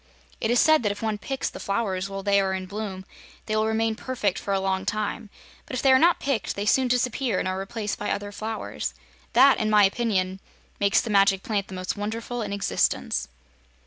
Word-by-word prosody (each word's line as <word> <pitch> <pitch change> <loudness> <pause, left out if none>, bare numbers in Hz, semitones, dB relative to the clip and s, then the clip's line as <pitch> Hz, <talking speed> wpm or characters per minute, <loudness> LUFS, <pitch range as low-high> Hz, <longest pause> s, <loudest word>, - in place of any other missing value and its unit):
It - - -1
is 240 0 +4
said 315 -2 +5
that 210 -3 +1
if 205 +2 -7
one 215 -2 -1
picks 270 +5 -3
the - - -6
flowers 195 -2 -2
while 195 0 -5
they 200 0 +3
are 190 -1 0
in 185 0 -4
bloom 195 -1 -6 0.4
they 215 - -1
will 215 0 +2
remain 220 0 +1
perfect 220 -4 -2
for 200 - -4
a 195 - +2
long 190 0 -1
time, 215 +1 -3 0.4
but - - -5
if 250 - -1
they 270 - +6
are 260 - +7
not 340 +3 +4
picked 260 -8 -1
they 200 - -3
soon 260 +4 +3
disappear 250 -2 0
and - - -1
are 185 0 -2
replaced 205 +1 -4
by 205 - -2
other 205 0 -3
flowers. 220 +2 -4 0.4
That, 275 0 +6
in 215 -2 0
my 210 -1 +6
opinion, 195 -3 +1 0.4
make 200 0 +1
the 225 - +3
Magic 195 -1 +4
Plant 205 -3 -1
the 190 - -8
most 185 +2 -3
wonderful 230 +3 -4
in 205 -2 -4
existence." 130 - 0
210 Hz, 215 wpm, -25 LUFS, 195-230 Hz, 0.4 s, are